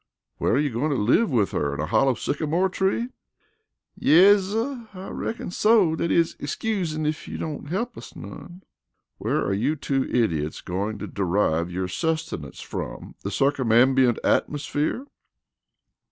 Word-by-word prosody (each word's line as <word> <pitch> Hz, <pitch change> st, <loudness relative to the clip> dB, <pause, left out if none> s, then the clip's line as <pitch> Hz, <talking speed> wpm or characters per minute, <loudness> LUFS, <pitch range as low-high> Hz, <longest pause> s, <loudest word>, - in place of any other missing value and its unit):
"Where -, -, +1 dB
are -, -, +3 dB
you 145 Hz, -2 st, 0 dB
going 125 Hz, +7 st, -1 dB
to 145 Hz, -, +1 dB
live 125 Hz, -, +3 dB
with 115 Hz, -8 st, +1 dB
her 70 Hz, -1 st, -1 dB
in -, -, -7 dB
a 75 Hz, -, 0 dB
hollow 135 Hz, +10 st, +3 dB
sycamore 160 Hz, +8 st, 0 dB
tree?" 195 Hz, +6 st, 0 dB, 0.9 s
"Yes, 190 Hz, +5 st, +6 dB
suh, 230 Hz, +4 st, -3 dB
I 185 Hz, +1 st, -7 dB
reckin 225 Hz, -5 st, -4 dB
so 205 Hz, -5 st, +4 dB
dat 170 Hz, -, -1 dB
is, 165 Hz, 0 st, +2 dB
excusin' 155 Hz, -1 st, -2 dB
ef 155 Hz, 0 st, -2 dB
you -, -, -5 dB
don't 150 Hz, -2 st, -5 dB
he'p 230 Hz, +7 st, -2 dB
us -, -, -11 dB
none." 175 Hz, -, -10 dB, 0.6 s
"Where -, -, 0 dB
are 100 Hz, -, 0 dB
you 125 Hz, +10 st, +1 dB
two 135 Hz, -2 st, -1 dB
idiots 80 Hz, -11 st, 0 dB
going 100 Hz, +4 st, -3 dB
to -, -, -6 dB
derive 90 Hz, -3 st, 0 dB
your 90 Hz, +1 st, -2 dB
sustenance 160 Hz, -, -3 dB
from -, -, -6 dB
the 100 Hz, -, -3 dB
circumambient 130 Hz, 0 st, +3 dB
atmosphere?" 150 Hz, -, 0 dB
145 Hz, 155 wpm, -24 LUFS, 110-185 Hz, 0.9 s, Yes